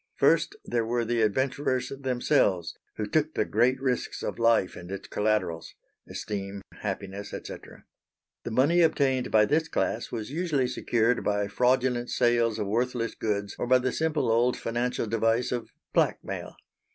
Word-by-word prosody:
First 410 - +3
there 120 -1 0
were 120 +1 0
the 120 0 0
adventurers 130 +3 0
themselves 130 - +1 0.2
who 105 - -2
took 155 +7 0
the - - +1
great 125 +4 +2
risks 130 -2 -2
of - - -4
life 115 -5 +3
and 90 - -9
its 100 0 -6
collaterals 105 -6 -1 0.3
esteem, 100 -1 -5 0.2
happiness, 100 0 -5
&c. - - -5 1.1
The - - -4
money 145 +9 +3
obtained 135 -6 +2
by 105 -1 +5
this 160 +6 +1
class 120 -7 -1
was 115 +1 -5
usually 155 -5 0
secured 120 -1 +1
by 105 -1 0
fraudulent 125 +2 +1
sales 120 -2 +2
of 105 - -2
worthless 115 +2 -1
goods 100 -2 -2
or - - -1
by 130 +1 +6
the 130 0 -1
simple 155 -6 0
old 120 +2 +3
financial 120 +1 -1
device 115 +2 +1
of 120 -2 -3 0.2
blackmail. - - -1
120 Hz, 150 wpm, -27 LUFS, 105-130 Hz, 1.1 s, by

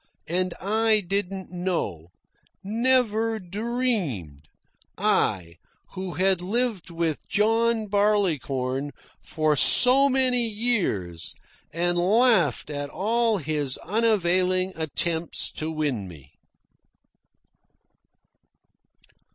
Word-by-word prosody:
And 180 +2 -1
I 220 +2 +2
didn't 195 0 -4
know, 175 - -3 0.6
never 225 0 +1
dreamed 185 - -3 0.5
I, 85 -2 0 0.3
who 185 -1 -6
had 190 -1 +2
lived 215 0 -1
with 165 -2 -3
John 225 +2 +1
Barleycorn 150 -10 0 0.3
for 155 -1 0
so 260 - +5
many 255 -3 +2
years 200 - -2 0.4
and 175 +2 0
laughed 190 - +3
at 145 -1 -4
all 225 +5 +1
his 150 -5 -1
unavailing 185 -3 +1
attempts 160 +1 -2
to 155 - -5
win 145 -10 -2
me. 80 -6 -14
185 Hz, 85 wpm, -25 LUFS, 155-220 Hz, 0.6 s, so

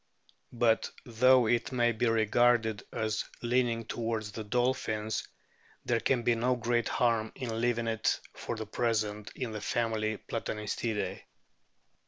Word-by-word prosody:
But, 115 -2 +2 0.2
though 125 +1 +5
it 120 +3 +1
may 120 -2 +3
be 115 +1 0
regarded 115 0 +3
as 110 -1 -1 0.2
leaning 120 -1 +1
towards 115 -2 -3
the 110 - -5
dolphins, 110 -1 -1 0.6
there 120 -1 +2
can 125 -1 +1
be 120 - +4
no 125 +2 +1
great 120 0 0
harm 115 -2 +1
in 115 -4 -3
leaving 120 -1 +1
it 115 -1 +1
for - - -5
the 110 -1 -5
present 105 -2 -1
in 125 -4 -3
the 105 -1 -5
family 110 -1 0
Platanistidae. 105 0 -3
115 Hz, 135 wpm, -30 LUFS, 110-120 Hz, 0.6 s, though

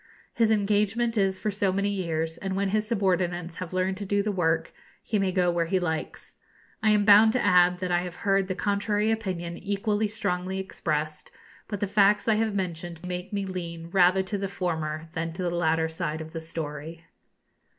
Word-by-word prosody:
His 225 -1 +2
engagement 210 +3 +1
is 195 -2 +2
for 210 +3 -2
so 200 -1 +1
many 200 +2 0
years, 165 -4 -2
and 190 -1 -3
when 195 0 0
his 215 +1 0
subordinates 180 -5 0
have 185 -2 -6
learned 185 +1 0
to 205 - -5
do 200 +1 +1
the 210 - 0
work 165 -4 0 0.3
he 215 - 0
may 195 -1 +1
go 180 -1 +2
where 170 -1 0
he 185 +2 +1
likes. 160 -3 -4 0.4
I 220 - +3
am 210 -1 +4
bound 215 +2 +7
to 250 - +1
add 180 -2 +5
that 180 -1 -2
I 175 - +3
have 180 -1 -6
heard 195 -1 +3
the 185 - -2
contrary 205 +2 0
opinion 180 -6 -3
equally 205 +1 0
strongly 190 -3 -2
expressed; 155 -5 -3 0.4
but 205 -2 -5
the - - +2
facts 205 +1 +3
I 225 - +5
have 220 -2 -1
mentioned 175 -2 -4
make 180 0 -5
me 200 -1 -2
lean 170 -3 -6
rather 185 0 +4
to 200 +1 -3
the 195 - -2
former 160 -5 -3
than 165 -1 -3
to 180 - -4
the 175 - 0
latter 160 -1 +1
side 160 -1 -3
of 160 0 -8
the 165 - -4
story. 160 0 -6
185 Hz, 200 wpm, -27 LUFS, 170-205 Hz, 0.4 s, bound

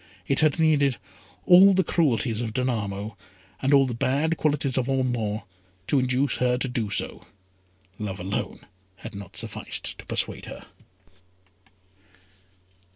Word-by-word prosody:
It 135 - +2
had 155 -1 +3
needed 145 -5 +3 0.5
all 190 +2 +8
the 190 - +3
cruelties 125 -9 +1
of 115 -2 -4
Danamo, 110 -4 -2 0.5
and 135 - +1
all 140 -1 +6
the 125 - -3
bad 140 +7 +1
qualities 145 -4 0
of 130 0 0
Ormond, 120 -5 -1 0.4
to 140 - +2
induce 130 +2 +1
her 125 0 +2
to 130 - -2
do 120 -4 -2
so. - - -3 0.7
Love 100 -3 -4
alone 95 +3 -4 0.3
had 115 +4 -9
not 100 -3 -9
sufficed - - -4
to - - -10
persuade - - -2
her. - - -9
130 Hz, 135 wpm, -25 LUFS, 110-140 Hz, 0.7 s, all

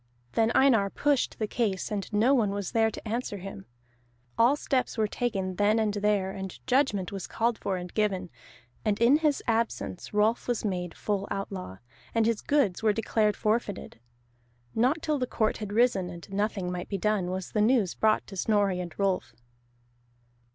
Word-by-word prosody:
Then 225 0 +2
Einar 230 -7 +4
pushed 285 +4 0
the 215 - -1
case, 210 -4 -1
and 205 -1 -3
no 220 +6 +4
one 230 -7 +3
was 200 -1 -3
there 225 -1 +3
to 220 - -9
answer 225 -2 -2
him. 180 - -9 0.7
All 240 +5 +5
steps 265 -4 -1
were 220 - +3
taken 195 -5 -2
then 210 +2 +3
and 215 -2 +1
there, 205 -2 +1
and 190 -1 -6
judgment 255 -8 +1
was 195 -2 -5
called 230 0 0
for 190 -2 -2
and 180 0 -7
given, 190 -4 0 0.5
and 210 -2 0
in 240 +5 +6
his 305 -3 +1
absence 225 - -2
Rolf 215 +3 +1
was 240 -2 -1
made 180 -4 -3
full 200 -1 -2
outlaw, 195 - -5 0.4
and 225 -1 +3
his 225 -2 +1
goods 270 -11 +1
were 215 -1 +3
declared 215 -1 +1
forfeited. 210 - -2 0.7
Not 265 +8 +1
till 300 -2 0
the 250 - -1
court 220 -2 0
had 210 -2 -6
risen, 210 -5 +2
and 170 -1 -9
nothing 195 -2 -1
might 180 -1 -5
be 200 - -1
done, 200 -2 0
was 185 0 -4
the 210 - +1
news 215 -5 +3
brought 215 0 +2
to 195 - -10
Snorri 200 -1 +1
and 175 -2 -6
Rolf. 185 - -1
210 Hz, 180 wpm, -28 LUFS, 190-230 Hz, 0.7 s, in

